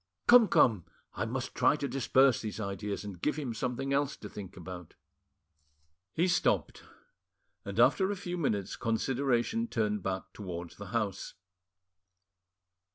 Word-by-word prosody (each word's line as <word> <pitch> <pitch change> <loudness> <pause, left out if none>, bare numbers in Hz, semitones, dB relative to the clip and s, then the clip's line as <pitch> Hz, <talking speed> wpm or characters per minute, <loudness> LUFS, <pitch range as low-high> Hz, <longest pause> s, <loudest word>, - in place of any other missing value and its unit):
Come, 240 -2 +8
come, 105 - +3 0.3
I - - -2
must - - -4
try - - +3
to 145 -1 -3
disperse 135 -1 +3
these 110 0 -5
ideas 100 0 -4
and 95 -4 -8
give 150 - +1
him 140 -6 -3
something 125 +4 -2
else 140 0 0
to 105 - -8
think 95 -2 -9
about." 90 -1 -9 1.2
He 170 +3 +2
stopped, 175 - +1 0.8
and - - -5
after 190 -1 +4
a 205 - -1
few 180 -2 -5
minutes 105 - -1
consideration 130 - 0
turned 105 - -1
back 95 +1 -4
towards 90 -4 -7
the 100 - -8
house. 105 -2 -3
115 Hz, 140 wpm, -31 LUFS, 100-140 Hz, 1.2 s, Come